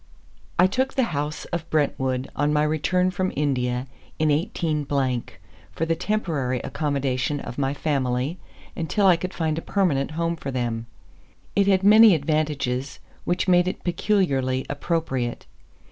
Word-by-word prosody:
I 180 - +6
took 260 +8 0
the 265 - +3
house 150 +1 -3
of 170 -1 -3
Brentwood 130 -4 0
on 145 0 +1
my 150 0 +2
return 175 +4 +1
from 185 +1 -1
India 125 -3 0 0.3
in 155 -1 +2
18, 155 -2 -1 0.9
for 165 - -1
the 165 0 +1
temporary 160 - -1
accommodation 140 -1 -1
of 125 -1 -7
my 135 0 0
family, 140 +2 -1 0.4
until 165 +5 0
I 185 -2 +7
could 180 +2 -4
find 160 -1 -1
a - - -8
permanent 165 -10 0
home 170 0 0
for 140 - -5
them. 120 -3 -2 0.7
It 200 -1 +3
had 190 -1 +3
many 215 -1 +8
advantages 140 -4 -1 0.3
which 175 +3 0
made 180 -1 +4
it 185 - -4
peculiarly 155 -9 +1
appropriate. 145 -5 -2
150 Hz, 145 wpm, -24 LUFS, 135-180 Hz, 0.9 s, many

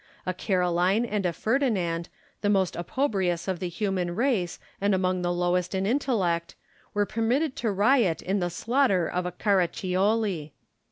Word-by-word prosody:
A 185 - -1
Caroline 185 +3 +1
and 210 -4 -1
a - - 0
Ferdinand, 185 - 0 0.3
the 205 - +1
most 190 -3 +2
opprobrious 185 - -1
of 185 -2 -1
the 180 -1 -3
human 180 -1 -2
race 225 -8 0 0.2
and 200 -1 +3
among 185 -1 0
the 175 0 0
lowest 175 +1 0
in 190 0 0
intellect, 200 -9 0 0.4
were 205 0 +2
permitted 250 +8 0
to 225 -3 0
riot 205 - +3
in 195 +2 0
the 175 -1 0
slaughter 215 - +1
of 180 0 -2
a - - -3
Caraccioli. 185 -2 0
190 Hz, 155 wpm, -26 LUFS, 175-220 Hz, 0.4 s, and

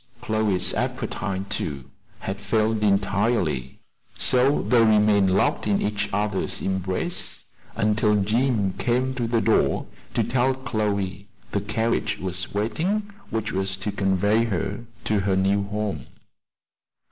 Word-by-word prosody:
Chloe's 110 -4 +1
appetite, 105 -5 -2
too, 70 -9 -3 0.4
had 95 +1 -4
failed 110 +2 +1
entirely; 100 - +1 0.4
so 130 +3 +3
they 120 -2 +4
remained 105 -3 +4
locked 95 +3 +1
in 100 -1 +2
each 105 -1 -1
other's 105 -1 -1
embrace 95 - -2 0.3
until 105 0 +2
Jim 105 -1 +1
came 125 +2 +1
to 120 -2 -2
the 115 -1 +1
door - - +2 0.3
to - - +3
tell 130 +1 +1
Chloe 100 -6 -2 0.2
the 100 - 0
carriage 110 +3 0
was 90 -1 -4
waiting 180 - -1 0.2
which 110 0 -2
was 95 0 -2
to 100 +2 -2
convey 100 +4 +2
her 100 +1 -3 0.2
to 105 -1 +1
her 95 -1 +1
new 100 +1 +2
home. 100 -9 -3
105 Hz, 125 wpm, -24 LUFS, 95-115 Hz, 0.4 s, they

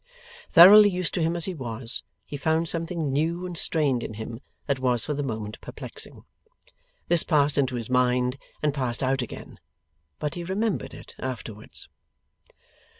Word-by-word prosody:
Thoroughly 205 +5 +9
used 180 -2 -2
to 175 - -1
him 165 +1 +1
as 170 - -1
he 190 - -3
was, 120 -5 -2 0.2
he - - -7
found 160 +3 +1
something 165 -3 -1
new 165 +5 0
and 180 -1 -5
strained 145 -7 +1
in 110 - -6
him 115 +1 -6 0.3
that 140 -2 0
was 125 -3 +1
for 150 - -2
the 145 - -2
moment 110 -5 -5
perplexing. - - -8 0.8
This 175 -2 +4
passed 145 -3 +2
into 130 -3 +1
his 115 -2 -3
mind, 125 0 +2 0.3
and 150 -2 +2
passed 130 -3 -1
out 130 0 +1
again; 120 - -8 0.6
but 150 -1 -3
he 175 - -5
remembered 195 +4 -2
it - - -12
afterwards. 115 -4 -6
140 Hz, 160 wpm, -26 LUFS, 125-170 Hz, 0.8 s, Thoroughly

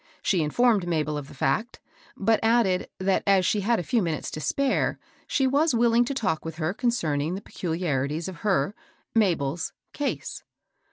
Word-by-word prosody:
She 185 -4 +2
informed 205 +4 +2
Mabel 155 -3 0
of 145 -2 -5
the - - -13
fact; 220 - -1 0.4
but 220 +3 +2
added, 225 -5 +2
that 190 0 +2
as 195 -2 +4
she 210 - +2
had 230 +4 +2
a - - -2
few 235 +5 +1
minutes 165 -4 -2
to 155 - -5
spare, 275 - +1 0.3
she 270 - +1
was 285 +2 +3
willing 235 +1 +4
to 275 - -3
talk 205 -11 -1
with 165 -1 -6
her 160 +2 -1
concerning 170 - 0
the - - -4
peculiarities 160 -4 -2
of 185 -3 -7
her 190 -4 +1 0.2
— - - -41
Mabel's 165 -4 -1
" - - -54
case." 290 -1 -3
190 Hz, 180 wpm, -26 LUFS, 160-235 Hz, 0.4 s, as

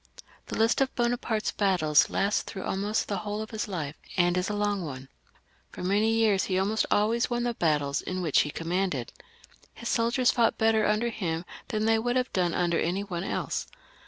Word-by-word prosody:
The - - -4
list 225 +4 +3
of 270 - 0
Bonaparte's 235 -2 0
battles 175 -7 +3
lasts 200 +2 +1
through 190 - -7
almost 205 +3 -1
the 200 - -2
whole 210 +2 -4
of 220 - -10
his 220 -1 -3
life, 160 -7 -4 0.2
and 175 0 +3
is 180 +2 0
a 210 - -2
long 205 -2 0
one. 135 -3 -7 0.6
For - - -8
many 205 +4 +2
years 220 -4 +3
he 185 - 0
almost 205 +3 +1
always 225 +3 +2
won 240 -1 -1
tlie 240 -1 -2
battles 145 -3 +1
in 185 0 -4
which 155 -4 +3
he 150 - -2
commanded. 165 -5 -2 0.6
His 235 - -5
soldiers 235 +2 +2
fought 235 -2 +2
better 220 -1 +3
under 215 +3 +1
him 175 -6 -3 0.2
than 215 0 -1
they 225 0 +3
would 245 +2 -1
have 255 0 0
done 175 -3 +1
under 175 -2 +1
any 180 +4 0
one 180 -3 -4
else. - - -2
205 Hz, 195 wpm, -28 LUFS, 175-225 Hz, 0.6 s, list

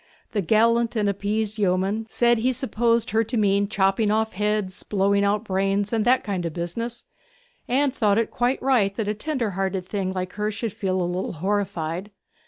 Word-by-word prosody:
The 210 - 0
gallant 230 +5 +3
and 210 -2 +1
appeased 210 +2 -1
yeoman 195 +3 0
said 240 0 +3
he 255 +3 +1
supposed 235 -2 0
her 220 +1 +3
to 230 +2 -2
mean 200 -1 +2
chopping 195 +1 +1
off 220 +1 +1
heads, 210 -1 -1
blowing 200 0 +1
out 205 +1 +1
brains, 195 +1 0
and 220 -2 +2
that 250 +1 +4
kind 195 -4 -2
of 165 -2 -3
business, 230 +8 -4 0.6
and 270 +2 +2
thought 210 -6 +2
it 230 - 0
quite 245 +2 0
right 225 -7 +2
that 220 -2 -2
a 210 - +1
tender 235 -1 -2
hearted 190 0 -2
thing 190 -1 -2
like 185 -1 -4
her 210 0 -1
should 215 0 -4
feel 190 -4 -1
a - - +1
little 180 +2 -2
horrified. 185 0 -2
210 Hz, 190 wpm, -24 LUFS, 195-230 Hz, 0.6 s, that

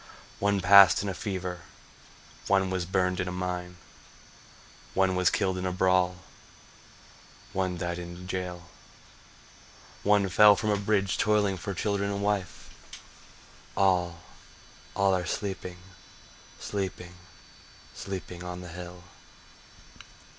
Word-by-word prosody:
One 100 -1 +1
passed 100 -1 +7
in 100 - -2
a - - -2
fever, 90 -2 -4 0.9
One 95 -1 +2
was 90 -2 -2
burned 90 -1 0
in 90 - -1
a - - -3
mine, 90 0 -4 1.2
One 95 -1 +3
was 90 -1 +3
killed 95 -3 0
in 90 - -4
a - - -1
brawl, 90 0 +1 1.3
One 95 -2 -1
died 85 0 -3
in 85 0 -8
a - - -11
jail, 90 -1 -5 1.4
One 100 -1 +3
fell 105 +3 +7
from 105 +1 -1
a - - +3
bridge 100 -1 0
toiling 105 -2 +2
for 90 +2 -5
children 100 +1 -1
and 100 0 -3
wife— 100 -3 -2 1.1
All, 90 -3 +2 0.7
all 100 -1 +3
are 90 -1 -1
sleeping, 95 -3 -4 0.8
sleeping, 95 -3 -4 0.8
sleeping 90 -2 -7
on 90 0 -6
the 90 - -9
hill. 90 +1 -9
95 Hz, 120 wpm, -28 LUFS, 90-100 Hz, 1.4 s, passed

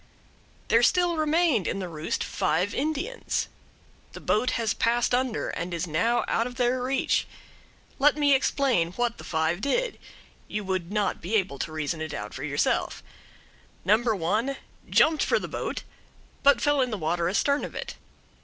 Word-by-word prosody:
There 230 - +5
still 350 +6 +3
remained 310 - +2
in - - -1
the 190 -2 -4
roost 160 -2 -3
five 185 +5 0
Indians. 315 - -2 0.7
The - - -8
boat 235 +4 +1
has 230 -2 0
passed 240 +1 +1
under 250 -2 0
and 170 +1 -4
is 170 +1 -2
now 205 +9 +1
out 230 - +1
of 250 - -9
their 250 0 +1
reach. 265 +2 +1 0.7
Let 290 +2 +4
me 290 -1 +4
explain 260 - +2
what 240 +2 -1
the - - -9
five 160 +3 -1
did - - 0 0.5
you 210 0 -3
would 185 -2 -2
not 210 -2 0
be 185 +7 -2
able 190 -10 0
to 160 - -3
reason 155 +1 -3
it 155 -2 -4
out 105 -3 -6
for 135 - -6
yourself. 145 -1 0 0.8
No. 205 +3 +6
1 225 +3 0 0.3
jumped 315 -1 +4
for - - +2
the - - -4
boat, - - -4 0.6
but 280 -4 +5
fell 290 0 +3
in 255 - +1
the 215 - -3
water 170 0 0
astern 280 +9 +1
of - - -6
it. - - -5
230 Hz, 170 wpm, -26 LUFS, 175-275 Hz, 0.8 s, No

